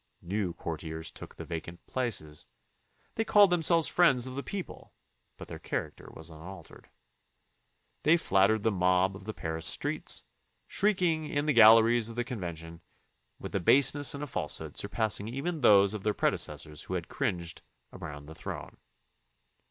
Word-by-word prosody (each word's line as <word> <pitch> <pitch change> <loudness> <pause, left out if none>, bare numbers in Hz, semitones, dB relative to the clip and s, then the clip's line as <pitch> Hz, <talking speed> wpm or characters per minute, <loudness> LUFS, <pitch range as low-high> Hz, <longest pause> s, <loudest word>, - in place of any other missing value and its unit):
New 95 0 -2
courtiers 80 -1 -5
took - - -11
the - - -8
vacant 85 0 -7
places. 105 -13 -4 0.7
They 225 - -1
called 205 -3 +5
themselves 165 -1 +3
friends 135 -9 +3
of 130 - -5
the 140 - -4
people, 190 +4 -7 0.4
but - - -10
their - - -8
character - - -5
was 80 +1 -10
unaltered. 85 +5 -12 1.1
They 160 +3 +4
flattered 100 - +2
the 110 - +2
mob 90 0 +2
of 95 0 -11
the 110 - -5
Paris 80 0 -3
streets, - - -1 0.4
shrieking 180 -6 0
in 145 0 -1
the 150 - +2
galleries 115 0 +6
of 115 - -8
the 120 - -1
Con 125 -2 -6
vention, 85 -2 -7 0.6
with - - -8
a - - +1
baseness 140 - +3
and 140 - -5
a - - -2
falsehood 140 - -3
surpassing 105 -1 -1
even 145 +7 -4
those 100 -3 +5
of 105 - -5
their 105 +1 -1
predecessors 75 -1 -1
who - - -4
had - - -4
cringed 85 -3 -3 0.3
around 75 -1 -8
the 80 - -10
throne. 80 - -8
110 Hz, 160 wpm, -29 LUFS, 85-140 Hz, 1.1 s, galleries